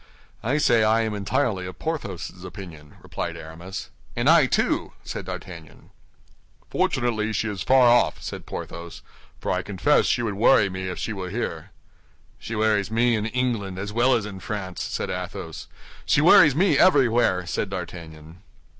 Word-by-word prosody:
"I 130 +6 0
say 120 -6 +4
I 110 +1 +3
am 110 -1 -1
entirely 100 -1 -1
of 90 - -9
Porthos's 100 - -5
opinion," 85 -5 -10
replied - - -5
Aramis. 85 +4 -8 0.2
"And - - 0
I, - - +6
too," - - 0
said - - -6
D'Artagnan. 80 -5 -9 0.8
"Fortunately, 110 -3 0
she 110 +2 -1
is 100 -4 -4
far 130 +3 +5
off," 120 0 +4
said - - -7
Porthos, 85 0 -7 0.4
"for - - -2
I 90 - 0
confess 100 +10 +2
she 120 - +1
would 110 -3 -1
worry 100 -1 +4
me 95 0 -4
if 90 - -5
she 110 - -3
were 95 -3 -5
here." 85 -7 -4 0.7
"She 115 - -6
worries 105 -2 +1
me 115 +2 +2
in 110 0 -1
England 115 -6 -2
as 100 +2 -5
well 125 +3 +3
as 110 -3 -1
in 100 -3 -7
France," 95 -2 -5
said - - -3
Athos. - - -6 0.4
"She - - +2
worries 150 -3 +7
me 165 -4 +3
everywhere," 120 - +4
said 85 +4 -2
D'Artagnan. 85 -2 -8
105 Hz, 165 wpm, -24 LUFS, 90-120 Hz, 0.8 s, worries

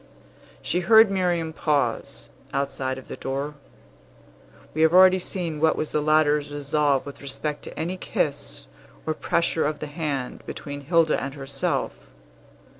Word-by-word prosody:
She 175 - 0
heard 220 +2 +6
Miriam 175 -4 0
pause, 145 -7 -1 0.2
outside 135 -1 -1
of 130 - -11
the - - -6
door. 140 +3 -3 1.2
We 155 - -1
have 160 +1 +5
already 185 0 +7
seen 175 -4 -3
what 160 0 +4
was 155 - -3
the 150 - +1
latter's 150 -1 +3
resolve 145 -1 +1
with 140 0 -9
respect 145 +2 -4
to - - -8
any 175 +4 -2
kiss 145 -5 -2 0.4
or 155 - 0
pressure 165 -1 0
of 150 0 -2
the 150 - -5
hand 145 -4 -3
between 145 -1 -6
Hilda 165 +2 +2
and 135 +1 -5
herself. 135 -1 -2
150 Hz, 145 wpm, -25 LUFS, 140-165 Hz, 1.2 s, already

